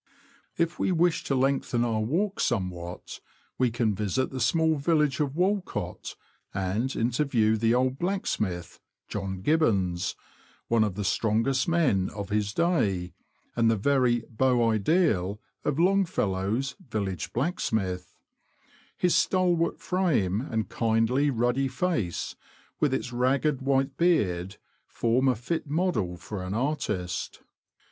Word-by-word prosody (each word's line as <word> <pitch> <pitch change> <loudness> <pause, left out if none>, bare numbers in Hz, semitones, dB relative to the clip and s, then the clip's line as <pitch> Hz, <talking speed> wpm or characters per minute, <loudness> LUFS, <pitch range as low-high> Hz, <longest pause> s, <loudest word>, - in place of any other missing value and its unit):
If 170 0 0
we - - +1
wish 175 -1 +2
to 135 - 0
lengthen 130 -2 +1
our 115 -2 0
walk 175 - -1
somewhat, 90 -6 -3 0.4
we 130 -1 +3
can 115 -2 0
visit 105 +6 -1
the 130 - -4
small 160 +5 +2
village 150 -1 +1
of 145 -2 -1
Walcott, 180 - -2 0.4
and 100 +8 -1
interview 115 -2 +2
the 115 +2 +2
old 130 +1 +1
blacksmith; 110 - -2 0.3
John 95 -2 -4
Gibbons, 100 - +1 0.5
one 115 -1 +3
of 105 -4 -2
the 105 - -3
strongest 115 +6 +1
men 145 - +2
of 100 -2 -5
his 105 0 0
day, 105 - 0 0.4
and 115 -1 +3
the 115 - +3
very 125 +1 +2
beau 120 -1 +2
ideal 105 - +1 0.2
of 150 -1 -1
Long 195 +3 +4
fellow's 105 - -1
Village 95 -7 -3
Blacksmith; 110 - -2 0.8
his 180 -1 +2
stalwart 175 -3 +2
frame 135 - +1
and 110 -5 -2
kindly, 115 +5 +1
ruddy 125 +2 +1
face, 130 - -2 0.4
with 150 - +2
its 125 -2 -2
ragged 135 +3 +1
white 135 0 +1
beard, 95 - +1 0.3
form 120 +3 +1
a 130 - +3
fit 145 +7 -3
model 145 - 0
for 100 +2 -6
an 90 +2 -4
artist. 105 -9 -2
120 Hz, 130 wpm, -27 LUFS, 105-150 Hz, 0.8 s, Long